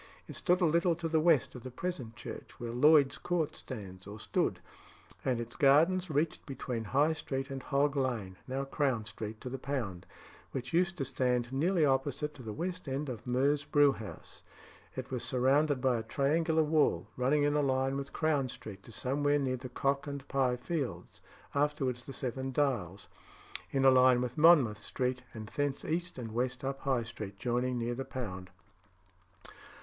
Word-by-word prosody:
It - - -8
stood 180 +1 +2
a - - +5
little 170 +2 +3
to 165 0 -3
the 160 0 +2
west 155 -6 +3
of 125 - -8
the 130 - -7
present 130 -6 -4
church, - - -9
where 120 -1 -4
Lloyd's 145 +3 +5
Court 170 -4 -1
stands 95 -6 -8
or 105 +2 -8
stood; - - 0 0.6
and 125 -3 0
its 120 0 -6
gardens 165 +6 +4
reached 155 +2 0
between 125 -4 -4
High 145 +8 +3
Street 135 -3 -4
and 135 -1 -4
Hog 140 +2 +1
Lane, 120 -9 -1
now 135 +1 -2
Crown 135 -5 0
Street, 110 0 -6
to - - -7
the 130 +1 -4
Pound, 110 -11 -4 0.5
which 130 +3 -4
used 180 +2 +2
to 140 - -1
stand 125 -2 0
nearly 165 +4 +3
opposite 140 +2 0
to 135 - -12
the 110 -3 -6
west 180 - -4
end 140 +2 -2
of 120 -1 -7
Meux's 140 +4 +2
Brewhouse. 140 -7 0 0.5
It 130 +1 -6
was 125 -2 -2
surrounded 135 +3 +2
by 125 -3 +2
a - - -3
triangular 160 +7 +1
wall, 150 - +2
running 135 +4 +2
in 145 0 +2
a 150 - +2
line 135 -1 +1
with 140 0 -4
Crown 150 -5 +1
Street 100 -4 -8
to 115 - -14
somewhere 145 +5 +1
near 130 -3 0
the 130 +1 -8
Cock 140 +3 0
and 140 -1 -6
Pye 130 -2 +1
Fields 140 +1 -4 0.3
(afterwards 140 -4 0
the 135 - -6
Seven 130 +1 -3
Dials), 120 - -1 0.6
in 135 -1 +1
a 135 - +9
line 130 -1 +6
with 125 0 -2
Monmouth 150 -10 +6
Street, 125 +3 -2
and 110 -1 -6
thence 145 +1 -2
east 175 +1 -2
and 115 -3 -5
west 125 +3 -2
up 135 0 -2
High 130 -4 0
Street, 105 -3 -7
joining 125 +3 0
near 120 0 -1
the 135 +2 -3
Pound. 95 -9 -6
135 Hz, 180 wpm, -32 LUFS, 120-145 Hz, 0.6 s, a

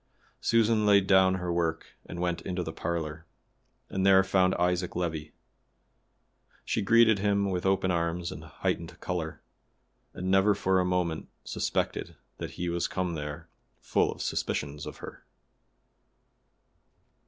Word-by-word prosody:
Susan 115 -1 +3
laid 100 -2 +5
down 95 -1 +5
her 90 -2 -2
work 80 -2 -1 0.2
and 85 - -7
went 85 -1 -1
into 90 -1 -3
the 80 -1 -5
parlor, 80 -1 -4 0.6
and 95 - -2
there 95 0 +6
found 95 -1 +2
Isaac 90 0 0
Levi. 80 -3 -2 1.4
She 110 - 0
greeted 110 0 +5
him 100 -1 +1
with 90 +1 -1
open 95 -1 +2
arms 85 0 -1
and 80 - -8
heightened 65 -5 -3
color, 85 -3 -4 0.7
and 90 +1 -2
never 95 +2 +4
for 95 0 +2
a 90 - +2
moment 90 -3 -1
suspected - - -2 0.2
that - - -4
he 90 - -2
was 85 0 0
come 90 -2 -2
there 75 -2 -6 0.3
full - - +1
of - - -6
suspicions 75 0 -2
of - - -8
her. - - -11
90 Hz, 140 wpm, -29 LUFS, 85-95 Hz, 1.4 s, there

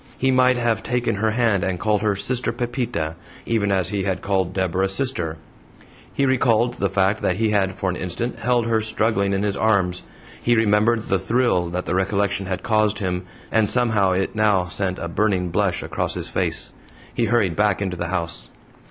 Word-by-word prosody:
He 130 0 +2
might 130 0 +4
have 115 -2 0
taken 125 0 -1
her 110 +2 +1
hand, 110 -4 +1
and 90 -2 -1
called 105 0 +1
her 105 -2 +1
"Sister 125 +6 -1
Pepita," 120 - -3 0.3
even 105 -3 0
as 95 -3 +1
he 100 -2 -2
had 95 -1 -2
called 95 -3 0
Deborah 95 0 0
"Sister." 95 - -2 0.7
He 140 - 0
recalled 120 -3 +2
the 100 - +1
fact 95 +2 +1
that 90 - +1
he 110 +2 +1
had 95 -2 +1
for 95 -1 -1
an - - -4
instant 95 +8 -4
held 120 -2 +1
her 115 -1 +1
struggling 110 -2 +1
in 100 0 0
his 100 -1 0
arms: 100 -5 +1 0.4
he 120 - +3
remembered 110 +1 +2
the 95 - +2
thrill 95 -3 +1
that 90 +1 -3
the - - -2
recollection 100 +1 0
had 95 -1 -3
caused 110 -2 +2
him, 90 -2 -2 0.3
and 110 -2 +3
somehow 110 -6 +2
it 95 +1 -1
now 105 -4 +2
sent 95 +1 -3
a 85 - -4
burning 95 0 0
blush - - 0
across - - -3
his - - -4
face. - - -2 0.4
He 120 - +1
hurried 105 -6 +1
back 105 -2 +2
into 95 -3 -2
the 85 - -3
house. 85 -2 -3
100 Hz, 195 wpm, -22 LUFS, 95-115 Hz, 0.7 s, might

